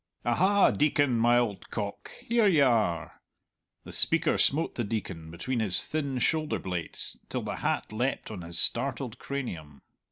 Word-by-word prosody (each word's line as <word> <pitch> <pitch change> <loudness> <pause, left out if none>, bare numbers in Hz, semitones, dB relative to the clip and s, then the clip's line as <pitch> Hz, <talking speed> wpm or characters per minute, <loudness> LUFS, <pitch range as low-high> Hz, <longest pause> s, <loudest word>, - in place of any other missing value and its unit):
"Aha, 190 +12 +4
Deacon, 145 -3 +2
my 120 +1 +4
old 115 -5 -1
cock, 100 -2 -5 0.2
here 235 -2 +3
you 160 -7 +5
are!" 110 -10 0 0.6
The - - -10
speaker 165 -1 +2
smote 160 +4 +2
the 120 - -2
Deacon 95 -7 -4
between 115 +10 -3
his 100 -5 +2
thin 140 -4 -2
shoulder 155 +4 0
blades 90 -3 -5
till - - -3
the - - -4
hat - - -2
leapt 120 +1 -2
on 100 -4 -6
his 85 0 -6
startled 125 -1 +1
cranium. 85 - -6
120 Hz, 155 wpm, -28 LUFS, 100-145 Hz, 0.6 s, you